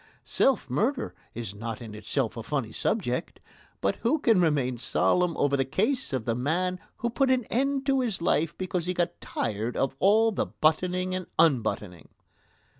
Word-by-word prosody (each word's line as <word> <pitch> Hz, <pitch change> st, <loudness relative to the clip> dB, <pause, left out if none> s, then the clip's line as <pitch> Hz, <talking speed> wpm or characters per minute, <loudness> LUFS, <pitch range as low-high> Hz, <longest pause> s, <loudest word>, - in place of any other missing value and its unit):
Self 265 Hz, -, +2 dB
murder 225 Hz, -, 0 dB, 0.2 s
is 115 Hz, -4 st, -5 dB
not 110 Hz, +2 st, -5 dB
in 115 Hz, -3 st, -9 dB
itself 110 Hz, +3 st, -2 dB
a 115 Hz, -, -5 dB
funny 125 Hz, -1 st, -2 dB
subject, 145 Hz, -, -2 dB, 0.4 s
but 100 Hz, -, +1 dB
who 245 Hz, +7 st, +1 dB
can 225 Hz, -10 st, +3 dB
remain 135 Hz, -7 st, +1 dB
solemn 180 Hz, +7 st, +1 dB
over 145 Hz, -1 st, +2 dB
the 135 Hz, -, +2 dB
case 215 Hz, -, 0 dB
of 130 Hz, -5 st, -2 dB
the 115 Hz, -, +1 dB
man 175 Hz, +9 st, 0 dB, 0.2 s
who 235 Hz, -, -1 dB
put 270 Hz, +2 st, +2 dB
an 255 Hz, -1 st, +3 dB
end 275 Hz, +2 st, +1 dB
to 270 Hz, -1 st, +3 dB
his 235 Hz, -7 st, -1 dB
life 165 Hz, -1 st, +1 dB
because 185 Hz, -2 st, -2 dB
he 180 Hz, -, -1 dB
got 175 Hz, -1 st, -1 dB
tired 110 Hz, +2 st, -3 dB
of 135 Hz, 0 st, 0 dB
all 220 Hz, +3 st, +5 dB
the 200 Hz, -, -1 dB
buttoning 180 Hz, +4 st, +1 dB
and 185 Hz, -1 st, -3 dB
unbuttoning. 110 Hz, -, +1 dB
165 Hz, 175 wpm, -27 LUFS, -, 0.4 s, all